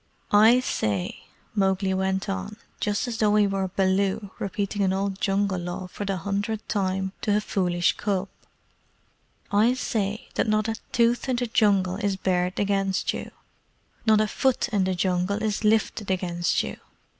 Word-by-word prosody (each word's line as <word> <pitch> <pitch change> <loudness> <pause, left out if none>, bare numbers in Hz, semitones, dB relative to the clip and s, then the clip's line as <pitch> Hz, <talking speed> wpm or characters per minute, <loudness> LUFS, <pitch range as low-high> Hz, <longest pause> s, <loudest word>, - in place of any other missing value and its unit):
"I 225 +4 +7
say," 100 - -2 0.3
Mowgli 190 -2 +1
went 190 +1 -1
on, 195 +2 -4 0.2
just 205 +4 -1
as 235 -1 -4
though 210 -1 +3
he 210 -1 +5
were 195 -1 -1
Baloo 195 +2 0
repeating 200 +1 -2
an 190 -1 +2
old 195 0 -2
Jungle 195 -1 +1
Law 175 +2 -5
for 190 +3 -6
the 195 -1 -1
hundredth 205 +4 -3
time 190 -2 -1
to 210 -1 +2
a - - +3
foolish 180 -4 +1
cub 195 -2 -1 1.2
"I 220 +5 +4
say 215 -4 -2
that - - 0
not 215 0 +2
a 225 - 0 0.2
tooth 240 +2 +2
in 255 - +2
the 245 0 0
Jungle 200 -5 +2
is 200 -2 0
bared 180 -1 0
against 195 -1 0
you; - - -5 0.8
not 215 -1 +6
a 215 - +1
foot 265 +4 +1
in 205 -5 +1
the 185 0 0
Jungle 185 +3 0
is 215 0 -1
lifted 215 -1 +1
against 175 -2 0
you. 70 - -6
200 Hz, 165 wpm, -25 LUFS, 190-215 Hz, 1.2 s, I